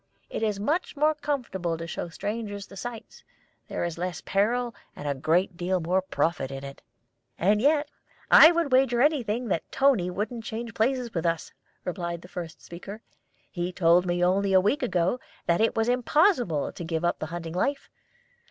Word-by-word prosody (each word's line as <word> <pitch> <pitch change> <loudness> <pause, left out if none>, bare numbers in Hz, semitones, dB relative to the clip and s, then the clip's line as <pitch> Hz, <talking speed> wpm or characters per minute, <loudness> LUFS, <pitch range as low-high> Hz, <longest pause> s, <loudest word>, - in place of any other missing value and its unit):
It - - -3
is 210 -3 0
much 305 - -1
more 305 +2 +4
comfortable 245 - -2
to 165 - -6
show 170 - -5
strangers 205 +2 -4
the 200 - -14
sights; 235 +2 -8 0.4
there - - -3
is 170 -1 -3
less 180 0 -3
peril 235 +5 +1 0.2
and 145 - -6
a 140 - +1
great 170 +6 +1
deal 180 +1 0
more 180 +3 +1
profit 170 -6 -1
in 135 0 -7
it." 140 0 -9 0.6
"And 205 +4 +3
yet 295 +2 +3 0.4
I 320 - +10
would 335 -5 0
wager 255 -2 +4
anything 245 -6 +1
that 165 - -2
Toni 260 -10 +3
wouldn't 220 +5 -4
change 230 +1 -5
places 245 +1 0
with 170 -1 0
us," 165 -1 -2 0.3
replied 170 -2 -4
the - - -11
first 175 -3 -8
speaker. 200 +6 -9 0.5
"He 175 0 -3
told 175 0 +3
me 175 0 +2
only 195 +2 +2
a 190 - +7
week 210 +10 +1
ago 185 -1 +1 0.3
that 170 +2 +2
it 225 - +2
was 225 0 +1
impossible 245 - +2
to - - -8
give 165 0 -2
up 175 - 0
the 155 - -4
hunting 165 0 -6
life. 275 +10 -1
195 Hz, 180 wpm, -27 LUFS, 175-245 Hz, 0.6 s, I